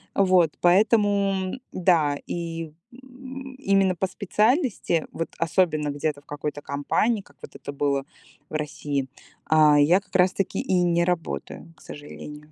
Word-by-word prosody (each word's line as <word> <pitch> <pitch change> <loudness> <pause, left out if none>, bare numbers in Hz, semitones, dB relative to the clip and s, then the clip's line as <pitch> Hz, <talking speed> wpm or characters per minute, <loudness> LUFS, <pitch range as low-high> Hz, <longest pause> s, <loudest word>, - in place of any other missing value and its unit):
Вот, 185 -5 +4
поэтому, 200 0 +3 0.2
да, 165 -6 +2
и, 165 -2 -4 0.2
м, 265 +1 -10
именно 195 -7 +2
по 190 +2 -1
специальности, 210 - +1
вот 165 - -4
особенно 160 -3 +1
где-то 145 0 -2
в - - -37
какой-то 145 0 -5
компании, 200 +10 0
как 145 -6 -23
вот - - -11
это - - -7
было 140 -1 0 0.5
в - - -15
России, 145 -2 -3 0.4
а 155 -2 +5
я 165 +6 +5
как 190 - -23
раз-таки 185 +1 +2
и 180 -1 +1
не 170 -1 +2
работаю, 165 - -4
к - - -22
сожалению. 150 +1 -10
175 Hz, 140 wpm, -24 LUFS, 150-195 Hz, 0.5 s, а